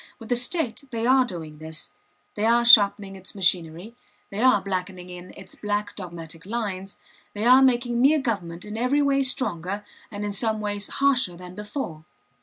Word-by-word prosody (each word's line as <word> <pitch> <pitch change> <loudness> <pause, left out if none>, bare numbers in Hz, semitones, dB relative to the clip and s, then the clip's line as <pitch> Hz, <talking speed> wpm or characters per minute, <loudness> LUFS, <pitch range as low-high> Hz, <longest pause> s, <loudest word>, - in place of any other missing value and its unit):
With 225 - -12
the 245 - +2
state 250 +1 0
they 230 -1 -3
are 260 +1 +5
doing 160 -7 -8
this; 160 0 -6 0.4
they 210 - -4
are 235 +1 +4
sharpening 200 -3 +6
its 190 +1 -8
machinery, 180 +2 0 0.4
they 200 +2 -3
are 255 -4 +5
blackening 185 -1 -5
in 180 0 -10
its 190 -1 -11
black 205 0 -3
dogmatic 165 -3 -8
lines, 200 -4 -4 0.4
they 210 +2 -2
are 255 +2 +7
making 245 -2 +2
mere 290 +4 +5
government 185 -9 -3
in 210 +1 -6
every 275 +4 +2
way 275 -1 +2
stronger 205 - -2 0.2
and 210 -1 -5
in 205 - -2
some 220 +2 0
ways 205 -1 -2
harsher 255 -10 +1
than 180 0 -10
before. 210 - -6
205 Hz, 175 wpm, -24 LUFS, 180-240 Hz, 0.4 s, are